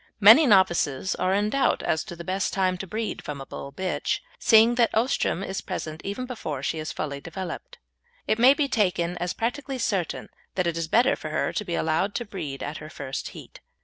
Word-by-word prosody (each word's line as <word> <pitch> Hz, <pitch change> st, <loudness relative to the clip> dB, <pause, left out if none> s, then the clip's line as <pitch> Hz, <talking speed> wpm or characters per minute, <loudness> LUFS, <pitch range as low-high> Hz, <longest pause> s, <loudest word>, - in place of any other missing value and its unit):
Many 225 Hz, +9 st, +9 dB
novices 185 Hz, -, +3 dB
are 185 Hz, -, 0 dB
in 205 Hz, +2 st, +1 dB
doubt 275 Hz, -1 st, +1 dB
as 160 Hz, -, 0 dB
to 175 Hz, -, -8 dB
the 170 Hz, -, -8 dB
best 190 Hz, +2 st, -1 dB
time 185 Hz, -1 st, +1 dB
to 195 Hz, -, -5 dB
breed 215 Hz, +2 st, -4 dB
from 145 Hz, -1 st, -5 dB
a 135 Hz, -, -7 dB
Bull 140 Hz, -, -8 dB
bitch, 185 Hz, +6 st, -1 dB, 0.2 s
seeing 225 Hz, -, +6 dB
that 240 Hz, -2 st, +3 dB
oestrum 220 Hz, -5 st, +1 dB
is 190 Hz, 0 st, -4 dB
present 155 Hz, 0 st, -5 dB, 0.3 s
before 155 Hz, -, -5 dB
she 160 Hz, -, -1 dB
is 155 Hz, -, -4 dB
fully 140 Hz, -2 st, -4 dB
developed. 175 Hz, +2 st, -7 dB, 0.5 s
It 215 Hz, -, 0 dB
may 260 Hz, +4 st, +7 dB
be 285 Hz, -1 st, +1 dB
taken 180 Hz, -7 st, +1 dB
as 175 Hz, +1 st, -2 dB
practically 265 Hz, +4 st, -3 dB
certain 195 Hz, -8 st, -2 dB, 0.3 s
that 185 Hz, -, +1 dB
it 170 Hz, -1 st, 0 dB
is 165 Hz, -1 st, -2 dB
better 240 Hz, +9 st, +4 dB
for 155 Hz, -, -7 dB
her 155 Hz, -, -1 dB
to -, -, -2 dB
be 175 Hz, -4 st, -3 dB
allowed 160 Hz, +6 st, 0 dB
to 240 Hz, -, -2 dB
breed 160 Hz, -10 st, -6 dB
at 150 Hz, +2 st, -4 dB
her 150 Hz, -, -9 dB
first 135 Hz, -3 st, -5 dB
heat. -, -, -12 dB
190 Hz, 210 wpm, -25 LUFS, 160-220 Hz, 0.5 s, Many